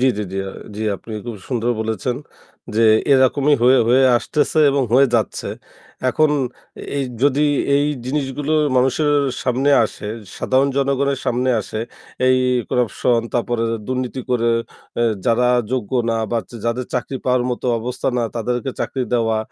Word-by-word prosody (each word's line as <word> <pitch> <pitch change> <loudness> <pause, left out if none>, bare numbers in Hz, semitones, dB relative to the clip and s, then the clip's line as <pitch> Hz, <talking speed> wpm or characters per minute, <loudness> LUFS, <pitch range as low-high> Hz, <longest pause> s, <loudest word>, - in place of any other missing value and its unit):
জি, - - +2
জি, - - -1
জি, - - -4
আ - - -6 0.3
জি। 110 - -3
আপনি 110 - -11
খুব 120 -2 -6
সুন্দর 120 -2 0
বলেছেন 110 +3 -2 0.6
যে 115 - +3 0.3
এরকমই 140 +2 +4
হয়ে, 130 +2 +6
হয়ে 130 +2 +5 0.2
আসতেছে 150 +5 0
এবং 140 0 +1
হয়ে 135 +2 +6
যাচ্ছে। 110 - 0 0.6
এখন 155 +4 +3 0.7
এ - - 0 0.2
যদি 145 +1 +3 0.3
এই 145 +1 +2 0.2
জিনিসগুলো 145 +1 -2 0.2
মানুষের 135 +4 +2 0.3
সামনে 130 +3 +1
আসে, 105 - -7 0.3
সাধারণ 135 +2 +2
জনগণের 140 0 +1
সামনে 125 +2 +1
আসে, 110 +1 -5 0.5
এই 130 0 +5 0.3
corruption 120 0 +1
তারপরে 120 -1 0 0.2
দুর্নীতি 130 0 -3
করে, 120 -1 +2 0.5
অ্যা 120 - +2 0.2
যারা 120 +1 +3 0.2
যোগ্য 125 -6 -2 0.2
না 115 - 0
বা 120 - +1
য - - -23
যাদের 120 +2 -1
চাকরি 125 +2 -2
পাওয়ার 125 -1 +2
মতো 125 - -3
অবস্থা 125 +2 -3
না, - - +1
তাদেরকে 125 +3 -2
চাকরি 130 - -2
দেওয়া। 115 -2 +1
125 Hz, 150 wpm, -20 LUFS, 120-135 Hz, 0.7 s, হয়ে